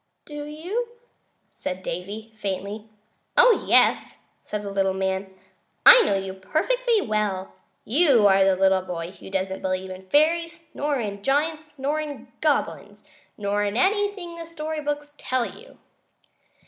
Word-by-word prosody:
"Do 295 -1 -7
you?" 375 +11 -4 0.6
said 185 0 -6
Davy, 205 +6 -6
faintly. 205 +1 -5 0.5
"Oh, - - +6
yes!" - - +3 0.3
said 210 -1 -5
the 200 - -5
little 195 -1 +1
man. 190 0 -2 0.5
"I - - +11
know 305 - +2
you 195 -1 -3
perfectly 430 - 0
well. 210 - -2 0.3
You 270 -4 +4
are 195 -1 +6
the 190 -1 +3
little 190 0 +3
boy 175 -1 -5
who 195 - -12
doesn't 190 0 -2
believe 185 0 -2
in 185 0 -10
fairies, 330 - +1
nor 290 0 -1
in 200 -3 -4
giants, 300 +4 -1
nor 285 +3 -1
in 300 -2 -7
goblins, - - -1 0.3
nor 205 0 0
in 205 +2 -1
anything 395 -1 0
the 330 - -7
story 315 -1 -5
books 295 0 -3
tell 255 -2 0
you." - - -12
220 Hz, 145 wpm, -24 LUFS, 195-315 Hz, 0.6 s, I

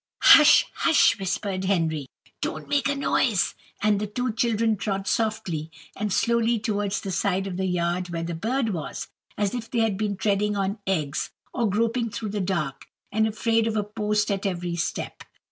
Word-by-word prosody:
"Hush, 305 0 +8
hush!" 310 -8 +4
whispered 190 0 -2
Henry; 160 -7 0 0.3
"don't - - -4
make 285 -1 +1
a 285 - 0
noise." 250 -6 +1 0.3
And 210 -1 +3
the 210 - -2
two 245 +4 -2
children 225 -1 +1
trod 195 -1 -3
softly 180 -8 -1 0.3
and 210 0 -2
slowly 235 +3 +2
towards 205 -2 -1
the 195 - -4
side 190 +1 0
of 190 -2 -4
the 190 +1 -1
yard 180 0 -1
where 165 -1 -3
the 170 +1 -3
bird 225 +8 -1
was, 165 -5 -5 0.3
as 205 -1 0
if 235 -2 -5
they 235 - 0
had 220 -4 +1
been 205 -1 -2
treading 205 +1 +1
on 195 +2 -1
eggs 155 -7 -1 0.2
or 235 -4 +1
groping 230 +3 0
through 215 0 -5
the 205 0 -2
dark 155 -8 -2 0.2
and 220 +1 +2
afraid 225 +1 +1
of 220 - -1
a 210 - +1
post 210 0 -1
at 200 0 -1
every 175 -2 -3
step. 170 - -4
205 Hz, 180 wpm, -25 LUFS, 185-225 Hz, 0.3 s, Hush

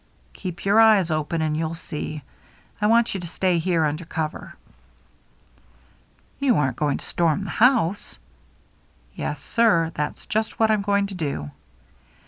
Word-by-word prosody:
" - - -35
Keep 180 -2 -7
your 200 +3 +4
eyes 210 -6 +5
open 155 +1 -1
and 155 -1 0
you'll 160 +1 -2
see. 155 -2 -6 0.6
I 210 - +3
want 230 +1 +3
you 195 - -3
to 175 - -6
stay 180 +1 0
here 165 -2 +1
under 155 +3 -2
cover." 160 -2 -5 0.9
" - - -34
You 270 -4 +3
aren't 130 -4 0
going 145 -2 0
to - - -10
storm 170 +2 0
the - - -5
house? 220 -6 +2 0.5
" - - -37 0.3
"Yes, 150 - -4
sir, 170 -3 +2
that's 150 - -4
just 220 +1 -2
what 220 -1 +4
I'm 215 -2 +2
going 200 0 +1
to 200 - -7
do." 140 - -4
170 Hz, 165 wpm, -23 LUFS, 155-205 Hz, 0.9 s, eyes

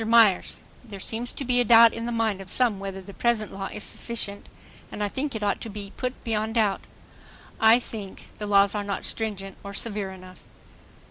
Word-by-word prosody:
MYERS: 220 -4 +4 0.3
There 210 -5 -9
seems 230 +5 -2
to 275 - -5
be 245 0 +3
a - - +4
doubt 230 0 +8
in 230 +1 -4
the - - -2
mind 220 -4 0
of 190 - -10
some 235 -4 +1
whether 195 -1 -6
the 200 - -11
present 230 -2 0
law 195 0 -4
is 210 - -2
sufficient 215 -4 -3 0.4
and 210 - -3
I - - +1
think 270 +5 -3
it 215 - -3
ought 205 - 0
to 230 - -5
be 200 -1 -7
put 255 0 -4
beyond 220 -1 -1
doubt. 210 -4 +2 0.8
I 225 +1 +7
think... 215 -5 -8
the 210 - -3
laws 200 -1 +5
are 210 -1 -2
not 200 -1 -3
stringent 195 -4 -3
or 200 0 -7
severe 205 -3 -2
enough 185 -1 -12
215 Hz, 205 wpm, -26 LUFS, 200-230 Hz, 0.8 s, doubt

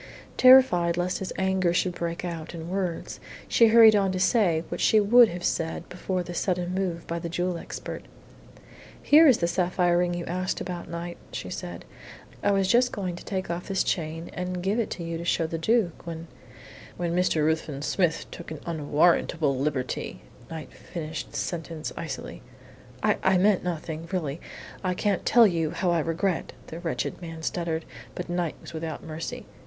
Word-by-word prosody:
Terrified 255 -10 +6
lest 180 +1 -1
his 190 - -4
anger 190 -2 +1
should 180 0 +1
break 170 0 -4
out 165 -1 -5
in 165 0 -7
words, 185 -3 -3 0.3
she 230 - +5
hurried 220 -1 +8
on 195 -2 +2
to 185 - -2
say 185 -5 +3
what - - -4
she 220 - +5
would 230 +3 +7
have 175 0 -6
said 165 -2 -1
before 180 0 -2
the 175 0 -7
sudden 180 0 -1
move 185 -3 -2
by 170 0 -3
the 170 - -5
jewel 175 +1 -1
expert. 170 - -7 0.9
"Here 310 +2 +7
is 260 - +6
the 170 - 0
sapphire 175 0 +2
ring 175 0 +1
you 175 - -4
asked 185 +1 -2
about, 175 -2 -5
Knight," 170 +1 -6
she - - -6
said. - - -6 0.6
"I - - +2
was 195 -1 +2
just 245 +4 +4
going 185 -4 -3
to - - -10
take 190 -3 -3
off 170 +1 -4
this 195 -1 +1
chain 165 0 -3
and 180 0 -4
give 200 +5 +1
it 230 - 0
to 175 - -5
you 165 0 -4
to - - -5
show 170 - +1
to 160 - -4
the 165 - -1
Duke 185 -3 +1
when 165 0 -5 0.4
" - - -17
"When 170 -1 -1
Mr. 175 -4 +2
Ruthven 155 -3 -1
Smith 170 -1 +1
took 170 - -9
an 155 -2 -6
unwarrantable 155 -1 +2
liberty," 135 -1 -3 0.3
Knight 160 -2 -8
finished 160 -2 -6
the - - -4
sentence 165 -2 -4
icily. 150 -5 -6 0.6
"I - - +3
I 190 0 +4
meant 195 +1 +3
nothing. 165 -2 -4
Really, 160 -5 -2 0.4
I 185 -1 0
can't 200 0 0
tell 235 -1 +7
you 165 -5 +1
how 180 +2 0
I 170 - +2
regret 165 +3 -1
" - - -22
the 165 - -8
wretched 170 +1 -3
man 165 -2 -8
stuttered. 165 -1 -2 0.3
But 180 - -5
Knight 175 -2 -1
was - - -10
without 160 0 -5
mercy. 160 0 -6
175 Hz, 190 wpm, -26 LUFS, 165-185 Hz, 0.9 s, hurried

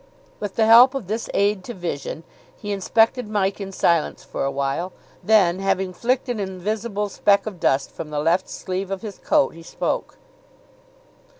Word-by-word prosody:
With 205 -2 -5
the 220 - +3
help 240 +4 +8
of 265 -7 -3
this 220 +4 -3
aid 200 -1 +1
to 240 - -6
vision 165 -3 -5 0.3
he 205 -2 -6
inspected 225 +4 +2
Mike 200 -1 0
in 195 -1 -5
silence 170 -4 +1
for - - -4
a 135 - +1
while, 140 +7 -2 0.3
then, 190 -5 +4
having 190 -1 0
flicked 250 +8 0
an 245 -3 -2
invisible 205 +2 -3
speck 200 0 +2
of 200 -5 -6
dust 135 -2 +1
from 155 - -7
the 150 - -4
left 170 +5 +1
sleeve 190 +1 -4
of 195 +2 -4
his 210 -3 -7
coat, 135 - +2
he 165 - -13
spoke. 165 - -3
195 Hz, 175 wpm, -22 LUFS, 175-215 Hz, 0.3 s, help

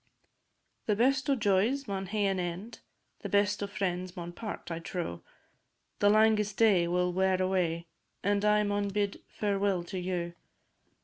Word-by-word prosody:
The 210 - +3
best 265 +4 +2
o' 275 - +4
joys 220 +5 +1
maun 195 -1 -3
hae 210 0 0
an 195 -1 +1
end, 180 +6 -5 0.4
The - - -6
best 205 0 +2
o' 205 - -1
friends 185 -2 -3
maun 175 0 -5
part, 210 -1 -7
I 165 - -3
trow; 165 - -4 0.8
The 205 - +5
langest 210 -1 +3
day 195 -7 +4
will 180 +1 +1
wear 190 0 +2
away, 180 -3 0 0.4
And 200 +1 +1
I 210 0 +4
maun 205 0 0
bid 200 0 -1
fareweel 200 -3 0
to 190 - -3
you. 175 -1 -3
195 Hz, 160 wpm, -30 LUFS, 180-210 Hz, 0.8 s, The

